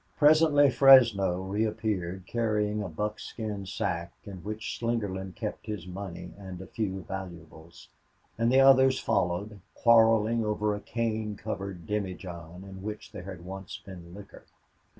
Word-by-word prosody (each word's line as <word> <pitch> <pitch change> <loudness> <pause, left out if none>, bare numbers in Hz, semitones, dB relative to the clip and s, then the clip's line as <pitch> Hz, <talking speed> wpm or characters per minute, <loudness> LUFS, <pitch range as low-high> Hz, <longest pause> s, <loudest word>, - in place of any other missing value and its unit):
Presently 150 -2 +5
Fresno 115 -10 +6
reappeared 100 -3 -2
carrying 105 -1 0
a 100 - -4
buckskin 105 +2 -5
sack 85 -3 -3
in 100 -2 -8
which 105 +5 -5
Slingerland 100 -5 -2
kept 105 0 -5
his 105 -5 -5
money 90 -1 -7
and 95 -1 -8
few 95 -4 -3
valuables, 85 -3 -9 0.5
and 115 +1 +1
the 135 +1 +6
others 130 -1 +6
followed, 100 +3 -1 0.2
quarreling 115 -1 +4
over 105 0 0
a 105 - -4
cane 110 -1 -2
covered 100 -4 -6
demijohn 90 -4 -5
in 95 -1 -10
which 105 +1 -7
there 90 - -8
had 90 -3 -8
once 95 0 -7
been 90 -2 -12
liquor. 100 0 -13
105 Hz, 130 wpm, -28 LUFS, 95-110 Hz, 0.5 s, Fresno